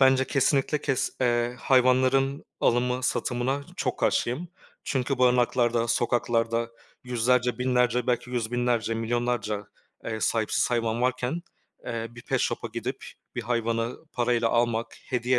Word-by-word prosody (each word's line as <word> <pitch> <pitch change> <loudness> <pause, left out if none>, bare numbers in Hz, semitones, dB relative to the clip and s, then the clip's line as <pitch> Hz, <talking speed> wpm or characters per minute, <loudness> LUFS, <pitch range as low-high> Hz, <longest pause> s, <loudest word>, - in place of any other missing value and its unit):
Bence 130 0 +5
kesinlikle 135 +2 +1
kes 135 -3 0
eee, 120 -1 +1
hayvanların 130 +2 +3 0.2
alımı, 125 +1 +2
satımına 130 +2 -1
çok - - -2
karşıyım. 135 +9 0 0.4
Çünkü 135 0 -1
barınaklarda, 120 -1 +3
sokaklarda 115 0 +1 0.3
yüzlerce, 125 0 +1
binlerce 125 -1 +2
belki 125 0 0
yüz 120 -3 -2
binlerce, 120 -2 +1
milyonlarca, 115 -2 -1 0.4
eee, 110 -1 -3
sahipsiz 110 +2 +1
hayvan 115 -1 0
varken, 130 +6 0 0.4
eee, 115 -1 -3
bir 120 0 -12
pet 135 -1 0
shop'a 115 0 -1
gidip 125 +3 -4 0.3
bir 120 - -3
hayvanı 115 0 -1 0.2
parayla 120 -1 +1
almak, 115 0 +1 0.2
hediye 125 0 +1
120 Hz, 125 wpm, -26 LUFS, 115-130 Hz, 0.4 s, Bence